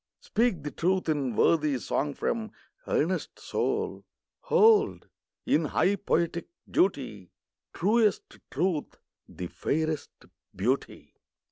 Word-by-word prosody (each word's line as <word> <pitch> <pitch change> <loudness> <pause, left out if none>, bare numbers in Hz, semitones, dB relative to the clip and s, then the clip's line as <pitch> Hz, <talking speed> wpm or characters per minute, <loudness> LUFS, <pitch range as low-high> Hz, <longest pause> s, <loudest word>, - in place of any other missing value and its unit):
speak 215 -9 0
the 150 - -4
truth 185 +1 0
in 140 -7 0
Worthy 150 -1 +3
song 145 +3 -2
from 225 -2 -2 0.4
earnest - - 0
soul! - - -2 0.4
Hold, 435 -1 +4 0.4
in 155 - +2
high 190 +6 +2
poetic 170 -2 -1 0.2
duty, 130 - 0 0.4
Truest 210 +2 +1
Truth 160 +1 -1 0.3
the 90 - -6
fairest 155 - -2 0.5
Beauty! 125 +8 -2
160 Hz, 100 wpm, -28 LUFS, 140-195 Hz, 0.5 s, Hold